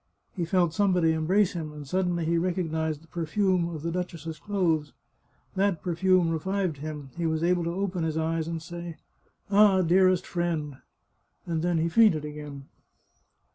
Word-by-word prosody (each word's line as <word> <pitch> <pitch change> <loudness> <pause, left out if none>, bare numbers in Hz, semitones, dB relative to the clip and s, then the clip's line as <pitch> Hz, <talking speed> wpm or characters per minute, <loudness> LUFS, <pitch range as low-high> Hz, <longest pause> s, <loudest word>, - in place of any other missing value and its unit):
He 175 -4 -1
felt 175 -1 +2
somebody 180 -4 +3
em 160 -1 -2
brace 195 +1 +3
him, 160 -3 -5
and 150 -2 -9
suddenly 175 0 0
he 170 +1 +2
recognised 160 -3 -2
the - - -20
perfume 175 +2 0
of 160 -3 -7
the 170 - -2
duchess's 165 -3 -5
clothes. 165 -9 0 0.6
That 190 -5 +1
perfume 180 0 +2
revived 185 0 -1
him; 145 -2 -7
he 170 -1 0
was 160 0 -1
able 175 0 +2
to 170 +1 -2
open 190 -3 -2
his 160 -1 -1
eyes 160 0 -1
and 165 -1 -4
say 170 -1 -7 0.3
" - - -30
Ah, 200 -2 +5
dearest 185 +1 +3
friend! 165 -5 -2 0.3
" - - -45
and 165 -2 -2
then 175 0 +1
he 160 +1 +1
fainted 170 -5 +4
again. 150 -2 -8
170 Hz, 175 wpm, -27 LUFS, 160-185 Hz, 0.6 s, Ah